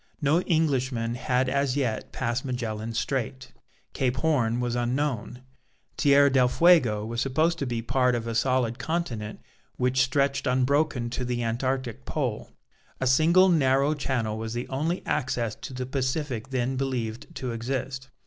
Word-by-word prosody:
No 155 +3 +2
Englishman 130 -9 0
had 125 +1 0
as 140 0 0
yet 115 -6 -2
passed 120 0 -2
Magellan's 115 -4 -3
Strait. 130 0 -3 0.4
Cape 125 -2 0
Horn 125 -8 +1
was 120 -1 -1
unknown. 125 0 -2 0.5
Tierra 140 0 +5
del 130 -2 +4
Fuego 125 -6 +4
was 115 +1 -3
supposed 160 +5 +1
to 140 - -2
be 115 -2 -2
part 125 +1 +2
of 115 -1 -3
a 115 - -3
solid 120 0 +1
continent 120 -11 -3 0.4
which 125 +1 +2
stretched 140 +1 +1
unbroken 130 -1 +1
to 125 - -3
the 120 -1 -2
Antarctic 125 +1 -2
pole. - - -3 0.5
A - - -1
single 165 +8 +5
narrow 140 -3 +3
channel 120 -7 -2
was 110 +1 -4
the 120 +2 -3
only 155 +7 -2
access 120 -5 -1
to - - -9
the 130 0 -4
Pacific 130 -2 -2
then 130 0 -1
believed 120 -4 -3
to 125 -2 -3
exist. 130 +3 -4
130 Hz, 150 wpm, -26 LUFS, 120-140 Hz, 0.5 s, Tierra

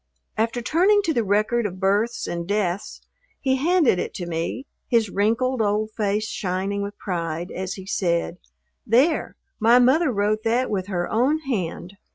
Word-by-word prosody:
After 230 +2 -1
turning 390 - +3
to 330 - 0
the 235 -4 +1
record 215 +3 +1
of 185 -1 -9
births 205 +5 +1
and 170 0 -4
deaths 200 -2 -2 0.4
he 265 -1 +1
handed 315 - +3
it - - -4
to 175 - -4
me, 170 +10 -3 0.2
his 225 -4 +2
wrinkled 230 +5 +1
old 215 +1 0
face 210 0 0
shining 195 +1 -2
with 200 +1 -5
pride 170 -2 -4
as 190 +1 -4
he 190 - -9
said, 175 -3 -1 0.4
"There, 265 +9 +2 0.2
my 230 +2 +5
mother 265 +5 +4
wrote 210 0 0
that 235 +2 +1
with 190 -2 -2
her 175 -3 -2
own 265 +8 +1
hand." 200 - -4
215 Hz, 165 wpm, -23 LUFS, 190-245 Hz, 0.4 s, my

